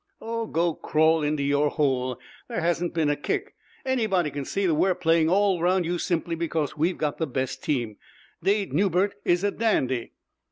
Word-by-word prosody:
"Oh, 230 0 -3
go 170 -1 +1
crawl 160 +1 +2
into 150 -1 0
your 145 +1 +2
hole! 130 -4 0 0.3
There - - -3
hasn't 175 +1 -1
been 155 -3 +2
a - - +1
kick. 405 - -3 0.3
Anybody 215 - +1
can 140 -1 -5
see 195 +7 -1
that 170 - +3
we're 180 +4 +2
playing 165 -2 +2
all 195 -1 +2
round 180 +1 +2
you 175 +1 -1
simply 170 0 -1
because 160 -3 -2
we've 165 +4 0
got 150 -2 -2
the 160 - 0
best 130 0 -3
team. 120 -8 -1 0.4
Dade 195 -2 +1
Newbert 190 +3 +2
is 175 +2 +2
a 205 - +2
dandy." 130 - 0
165 Hz, 185 wpm, -25 LUFS, 150-190 Hz, 0.4 s, that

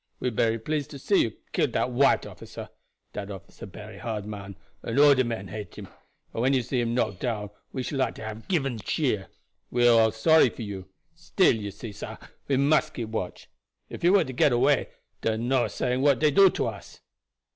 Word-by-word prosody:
We 125 - -1
bery 115 +1 +1
pleased 145 +5 -3
to 140 - -8
see 195 +9 +2
you 110 - -1 0.2
kill - - +2
dat 125 - -1
white 135 +3 +3
officer. - - -9 0.4
Dat 105 -1 -5
officer 95 -4 -10
bery - - -10
hard 110 -3 -4
man 100 -2 -7 0.3
and - - -4
all 145 0 +8
de 130 -1 +2
men 115 -5 -4
hate 105 -1 -7
him, - - -9 0.4
and 115 - -2
when 130 +3 +3
you 125 -1 0
knock 120 +1 +1
him - - -14
down 105 -4 -2 0.2
we 130 - -3
should 135 +2 -3
like 130 - 0
to - - -9
hab 110 +1 -7
given 135 -10 0
cheer. 105 -2 -1 0.4
We 120 0 +3
all 115 -2 +6
sorry 135 +6 +5
for 115 - -8
you; 95 -3 -7 0.2
still 165 - +2
you 105 -2 -5
see, 105 +3 -8
sah, 100 - -8 0.3
we 135 - +2
must 155 +2 +2
keep 115 -3 -4
watch. 95 -5 -5 0.4
If - - -9
you 175 +2 +5
were 200 -3 +5
to 130 -3 -7
get 130 - +3
away, 120 0 +2 0.3
dar 110 -1 0
no 120 +2 +1
saying 125 +1 -1
what 140 -1 +4
dey 155 -1 +3
do 195 +6 +7
to - - -2
us." - - -11
120 Hz, 210 wpm, -26 LUFS, 110-140 Hz, 0.4 s, all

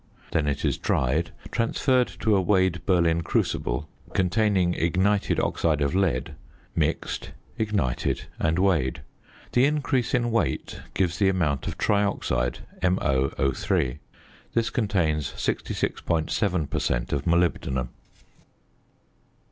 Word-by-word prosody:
Then 75 -2 +1
it 70 -1 -1
is - - 0
dried, 80 +7 +1 0.2
transferred 125 +2 +2
to 110 -2 +3
a 95 - +3
weighed 95 -2 +2
Berlin 85 -3 +3
crucible 75 -3 -1 0.3
containing 95 -1 +2
ignited 95 +5 +1
oxide 80 -3 +1
of 70 -1 0
lead, 95 -2 0 0.4
mixed, - - -1 0.3
ignited, 105 - 0 0.2
and 80 +1 +1
weighed. 80 -8 +1 0.5
The 125 +2 +4
increase 140 -4 +1
in 120 -1 +1
weight 115 - -1
gives 90 -2 0
the 100 - +4
amount 80 -8 0
of - - -4
trioxide, 65 -12 0 0.2
MoO_. 70 -5 +1 0.6
This 115 -1 +1
contains 85 - 0
66.7 85 0 -1
per - - 0
cent. - - -1
of 70 -1 -1
molybdenum. 80 -7 +1
90 Hz, 110 wpm, -26 LUFS, 75-105 Hz, 0.6 s, The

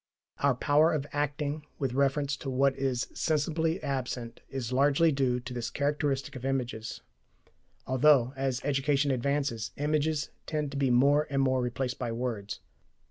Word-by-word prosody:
Our 140 -2 +3
power 150 +6 +4
of 145 -3 -1
acting 145 +1 -2
with 135 -3 -2
reference 140 +1 +1
to 135 - -5
what 135 +1 +2
is 130 -2 -1
sensibly 160 +1 0
absent 125 -4 -3
is 130 -2 -4
largely 145 +5 +4
due 130 -3 +1
to 125 +1 -7
this 120 -2 -3
characteristic 145 -2 -1
of 130 - -7
images, 125 -5 -3 0.8
although, 130 -1 +4
as 130 -2 -1
education 140 0 +1
advances, 130 -3 -1
images 150 0 0 0.2
tend 150 -2 -2
to 140 - -4
be 135 -1 +2
more 140 +5 +4
and 140 -1 0
more 130 -1 +2
replaced 125 +1 -2
by 115 - -2
words. 115 -4 -4
135 Hz, 150 wpm, -29 LUFS, 125-145 Hz, 0.8 s, power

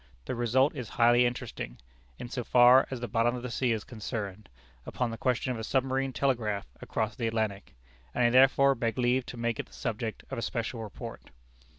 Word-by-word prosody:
The - - -3
result 125 +4 +2
is 125 -6 -5
highly 120 +1 +5
interesting, 120 - -5 0.4
in - - -6
so 125 0 -4
far 125 +2 +6
as 130 -3 -5
the 120 - -3
bottom 115 +3 +1
of 125 - -6
the 125 - -4
sea 125 0 +1
is 110 -2 -1
concerned, 110 -4 -6 0.3
upon 120 - -2
the - - -4
question 125 +1 0
of 120 - -4
a - - -5
submarine 135 +2 0
telegraph 115 -6 0 0.2
across 110 -1 -2
the 115 - -2
Atlantic; 100 - -2 0.4
and 125 - +2
I 120 - +4
therefore 135 +2 +6
beg 115 -3 -2
leave 125 0 +1
to 125 - -7
make 115 -1 -1
it - - -4
the - - -21
subject - - -4
of - - -3
a - - -3
special 115 - -3
report. 110 -2 -8
120 Hz, 205 wpm, -29 LUFS, 110-125 Hz, 0.4 s, far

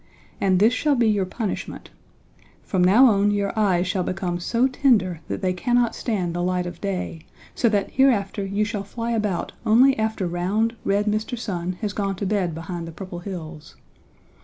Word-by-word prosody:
And 190 -2 +3
this 215 +6 +4
shall 290 +4 +1
be 235 -3 +2
your 205 -3 +1
punishment: 210 +1 -5 0.7
From 185 -2 0
now 210 +9 +6
on 205 -4 +4
your 205 -1 0
eyes 190 -5 +2
shall 185 +1 -1
become 180 -1 -2
so 235 +8 +1
tender 225 - +2
that - - -4
they 185 -1 +1
cannot 240 +5 +1
stand 185 -8 -2
the 175 - -2
light 180 0 0
of 175 -1 -7
day, 180 -5 -4 0.3
so 235 - +2
that 205 -2 0
hereafter 220 -7 +2
you 200 +2 0
shall 210 -2 -3
fly 230 +3 -4
about 210 -6 -1
only 255 +5 +5
after 220 -3 -1
round, 195 +7 0
red 200 +1 +1
Mr. 215 +3 -1
Sun 185 -6 -3
has 210 -2 -2
gone 195 -2 -2
to 200 - -4
bed 190 -5 0
behind 165 +1 -6
the - - -7
Purple 175 +1 -8
Hills. 165 -5 -8
200 Hz, 185 wpm, -23 LUFS, 180-220 Hz, 0.7 s, now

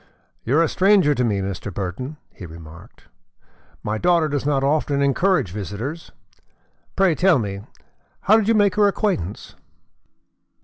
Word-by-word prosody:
"You 130 +6 +1
are 165 - +5
a - - +1
stranger 190 -4 +3
to 125 - -1
me, 105 -4 0
Mr. 95 +1 -5
Burton," 100 - -5 0.2
he 90 - -10
remarked. 80 0 -14 0.8
"My 110 +1 -2
daughter 170 0 +2
does 145 -1 -3
not 140 -2 +1
often 145 0 0
encourage 140 - +1
visitors. 105 - -6 0.8
Pray 190 -3 +3
tell 180 0 +3
me, 100 -4 -4 0.6
how 215 +3 +4
did 215 -2 0
you 225 - +3
make 205 -3 +3
her 205 -1 +5
acquaintance?" 190 - -2
140 Hz, 145 wpm, -21 LUFS, -, 0.8 s, are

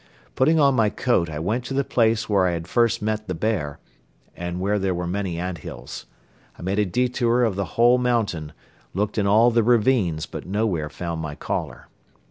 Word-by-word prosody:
Putting 155 +5 +3
on 140 -2 +5
my 110 -4 +3
coat 95 -8 0
I 75 - -5
went 105 +10 -1
to 135 - -4
the 140 - +2
place 115 -3 +1
where 100 -3 +3
I 90 - 0
had 85 -1 -5
first 115 -3 +1
met 110 0 -2
the 90 - -3
bear 80 -7 -2 0.6
and 90 0 -4
where 100 +2 0
there 95 -2 0
were 90 0 -3
many 90 -1 -2
ant 90 0 -4
hills. 70 -9 -9 0.5
I - - -10
made 95 +3 -1
a 105 - +2
detour 125 +3 +1
of 110 -5 +1
the 100 -3 -5
whole 120 +2 +5
mountain, 105 -11 -1 0.4
looked 105 +2 -1
in 100 - +1
all 110 +4 +5
the 115 0 +3
ravines 110 -8 +2
but - - -8
nowhere 95 -6 -1
found 85 +1 -5
my 75 -2 -5
caller. - - -4
105 Hz, 200 wpm, -23 LUFS, 85-115 Hz, 0.6 s, on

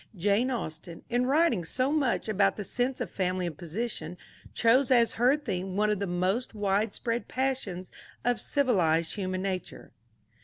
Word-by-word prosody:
Jane 205 +7 +2
Austen, 170 -8 -5
in 245 +1 +2
writing 300 - +3
so 255 - 0
much 285 -8 +1
about 200 -2 +2
the 210 - -4
sense 245 +6 -1
of - - -4
family 185 -1 -1
and 170 -3 -4
position, 175 0 -4 0.3
chose 240 +3 +3
as 235 -3 +4
her 250 +5 +3
theme 190 -9 -4
one 210 +1 +2
of 210 - 0
the 200 - -2
most 185 +7 -1
widespread 210 +3 -1
passions 250 -9 -2 0.3
of 245 -2 +1
civilized 175 - +2
human 185 -2 -3
nature. 185 -2 -5
210 Hz, 155 wpm, -28 LUFS, 185-245 Hz, 0.3 s, as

